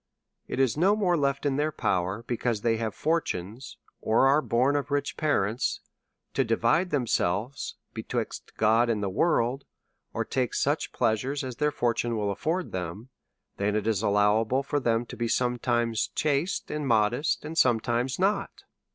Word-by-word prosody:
It - - -4
is 130 -4 +3
no 190 +6 +4
more 190 -5 +2
left 140 -2 0
in 140 -1 +1
their 150 +1 +1
power, 95 -3 -1
because 120 -3 -1
they 115 0 +1
have 110 -2 -3
fortunes, 125 - -2 0.2
or 115 +4 +3
are 140 +3 +4
born 130 +2 +2
of 145 -2 -1
rich 145 0 -1
parents, 120 -6 0 0.5
to - - +2
divide 180 +2 +2
themselves 120 - -1 0.2
be - - -4
twixt - - -5
God 115 +2 +3
and 105 -3 0
the 95 - -1
world, 130 - +1 0.5
or - - -2
take 130 -3 -1
such - - 0
pleasures 130 +6 0
as 130 -2 -6
their 150 0 +2
fortunes 120 -3 -1
would 105 -2 -1
afford 170 - -2
them, 95 +6 -5 0.5
than 100 +1 0
it 105 -1 -1
is 110 -3 +1
allowable 110 +5 +2
for 145 +1 -1
them 115 -2 +1
to - - -9
be 120 - -2
sometimes 120 -2 0
chaste 150 +5 0
and 150 -2 -3
modest, 120 +7 +1
and 160 +2 -6
sometimes 120 -1 +2
not. 195 +3 -1
120 Hz, 165 wpm, -27 LUFS, 110-145 Hz, 0.5 s, no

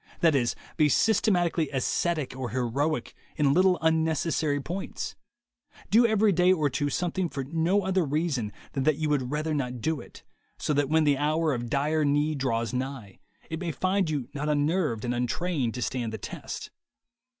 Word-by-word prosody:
That 165 -2 +5
is, 120 -4 +1 0.2
be 150 -1 +4
systematically 175 -6 +2
ascetic 150 +1 -1
or 130 -2 -4
heroic 130 +5 -1 0.2
in 145 -2 +3
little 185 +1 +4
unnecessary 160 -2 +1
points, 175 +7 -5 0.8
do 230 +3 +6
every 220 -1 +3
day 180 +1 +4
or 155 -6 +2
two 145 +2 0
something 175 +3 -1
for 135 - -4
no 165 +8 +1
other 190 -1 +1
reason 145 -7 -1 0.2
than 135 - -2
that 155 - +4
you 155 -1 -1
would 135 -4 0
rather 155 +2 -1
not 125 -4 -2
do 160 +6 -1
it, - - -14 0.3
so 150 - -1
that 145 -1 +1
when 160 +1 +4
the 145 -2 +2
hour 155 +1 +1
of 120 -1 -4
dire 150 +4 +1
need 145 +1 +1
draws 115 -3 -1
nigh, 130 -6 -5 0.3
it 160 - -3
may 175 -2 -2
find 185 +2 0
you 140 -6 -2
not 150 +1 -2
unnerved 150 - +1
and 120 - 0
untrained 125 +1 -1
to 125 - -2
stand 120 -4 -2
the 110 - -4
test. - - -7
150 Hz, 175 wpm, -27 LUFS, 135-165 Hz, 0.8 s, do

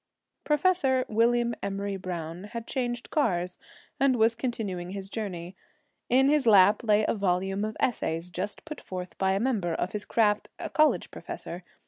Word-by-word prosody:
Professor 295 -5 +2
William 235 +2 +2
Emory 200 0 -3
Browne 175 -1 -5
had 230 +2 -6
changed 240 -2 -3
cars 180 - 0 0.4
and 270 -1 +4
was 225 0 +4
continuing 215 -8 -3
his 195 0 -6
journey. 185 -5 -5 0.5
In 265 +2 +5
his 290 -3 +3
lap 205 +1 +6
lay 215 -1 +3
a - - +2
volume 195 0 0
of 215 0 -3
essays 175 -7 -1
just 190 +4 -4
put 305 -1 -7
forth 180 -1 -7
by 190 0 +2
a 195 - +1
member 205 -8 0
of 180 - -2
his 210 -1 -4
craft, 210 -2 +2
a - - -6
college 310 0 +3
professor. 175 +2 -7
210 Hz, 160 wpm, -28 LUFS, 185-240 Hz, 0.5 s, lap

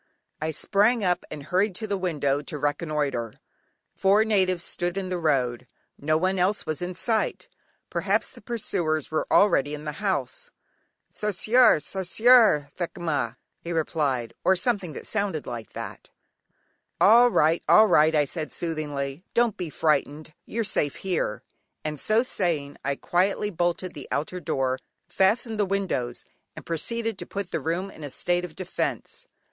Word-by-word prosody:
I 155 - -1
sprang 210 +8 +2
up 180 -1 +1
and 150 -2 -7
hurried 185 +5 0
to 220 - -3
the 200 -2 -1
window 145 -7 0
to 150 +1 -5
reconnoitre; 145 -6 -1 0.6
four 200 +3 +4
natives 185 -5 +2
stood 175 +1 -2
in 190 -1 -3
the 180 -1 -2
road; 130 -6 0 0.3
no 155 +2 0
one 185 +3 0
else 195 +4 +1
was 155 +1 -3
in 180 0 -4
sight; 220 +3 0 0.4
perhaps - - 0
the - - -15
pursuers 175 - -2
were 155 - -1
already 150 -8 +3
in 150 +1 -10
the 150 - -2
house. 145 -11 -2 0.6
"Sarsiar, 215 +1 +4
sarsiar, 190 - +4
thekinma," 155 -9 -2 0.2
he 170 - -7
repeated, 145 -7 -1
(or 190 - +4
something 190 -4 0
that - - -8
sounded 200 -8 -2
like 120 -2 -7
that). - - -8 0.9
"All 235 +4 +7
right, 160 -6 +3
all 215 - +8
right" 155 -5 +4
I 150 -1 +4
said 155 +2 -4
soothingly: 150 -2 -3
"don't 235 -3 +3
be 180 -3 -5
frightened, 155 0 0
you're 230 +1 -2
safe 145 -8 +1
here," 175 - -2 0.4
and 150 -1 -4
so 220 - +3
saying 160 - -1
I 140 +1 -1
quietly 195 +6 0
bolted 175 +1 -1
the 145 - -9
outer 155 +5 -2
door, 130 -5 -1 0.3
fastened 220 +3 +1
the - - +4
windows, 185 -12 -2 0.3
and - - -10
proceeded 225 +6 -1
to - - -6
put 200 -2 -5
the - - -1
room 180 +4 -2
in 155 - -12
a 145 - -5
state 175 +6 0
of 170 -3 -7
defence. 190 - -4
175 Hz, 155 wpm, -25 LUFS, 150-200 Hz, 0.9 s, all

